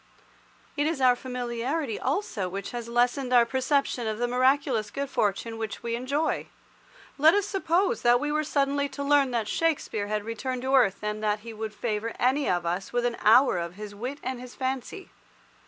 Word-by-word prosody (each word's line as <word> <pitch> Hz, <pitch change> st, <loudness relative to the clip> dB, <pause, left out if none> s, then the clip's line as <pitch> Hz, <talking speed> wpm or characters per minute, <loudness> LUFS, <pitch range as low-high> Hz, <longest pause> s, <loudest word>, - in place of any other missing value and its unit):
It 290 Hz, 0 st, +1 dB
is 320 Hz, -3 st, -1 dB
our 255 Hz, -2 st, +5 dB
familiarity 250 Hz, +2 st, -3 dB
also 260 Hz, -, -2 dB
which 195 Hz, +1 st, -5 dB
has 240 Hz, -1 st, -5 dB
lessened 245 Hz, +2 st, +1 dB
our 240 Hz, -2 st, +6 dB
perception 260 Hz, -1 st, 0 dB
of 215 Hz, -1 st, -2 dB
the 245 Hz, +1 st, 0 dB
miraculous 255 Hz, -3 st, +2 dB
good 280 Hz, +4 st, -4 dB
fortune 225 Hz, +2 st, -1 dB
which 220 Hz, -1 st, -5 dB
we 235 Hz, 0 st, -2 dB
enjoy. 280 Hz, +6 st, -1 dB, 0.7 s
Let 315 Hz, +5 st, +6 dB
us 410 Hz, -1 st, +2 dB
suppose 390 Hz, +3 st, 0 dB
that 240 Hz, 0 st, +5 dB
we 295 Hz, +3 st, -2 dB
were 305 Hz, +1 st, +1 dB
suddenly 280 Hz, -1 st, 0 dB
to 280 Hz, -, -5 dB
learn 280 Hz, -1 st, +4 dB
that 230 Hz, -3 st, -1 dB
Shakespeare 280 Hz, -9 st, -1 dB
had 210 Hz, 0 st, -2 dB
returned 250 Hz, +3 st, -4 dB
to 265 Hz, +1 st, -1 dB
earth, 215 Hz, -7 st, +3 dB
and 210 Hz, 0 st, -3 dB
that 210 Hz, 0 st, 0 dB
he 230 Hz, +1 st, -8 dB
would 220 Hz, 0 st, -6 dB
favour 225 Hz, 0 st, -2 dB
any 270 Hz, +3 st, +2 dB
of 175 Hz, -1 st, 0 dB
us 180 Hz, +3 st, -2 dB
with 245 Hz, 0 st, 0 dB
an 240 Hz, -1 st, -1 dB
hour 230 Hz, -3 st, +5 dB
of 170 Hz, +1 st, -5 dB
his 210 Hz, 0 st, -8 dB
wit 250 Hz, +7 st, -5 dB
and 255 Hz, 0 st, -3 dB
his 250 Hz, -1 st, -10 dB
fancy. 265 Hz, -, -4 dB
245 Hz, 190 wpm, -27 LUFS, 220-280 Hz, 0.7 s, our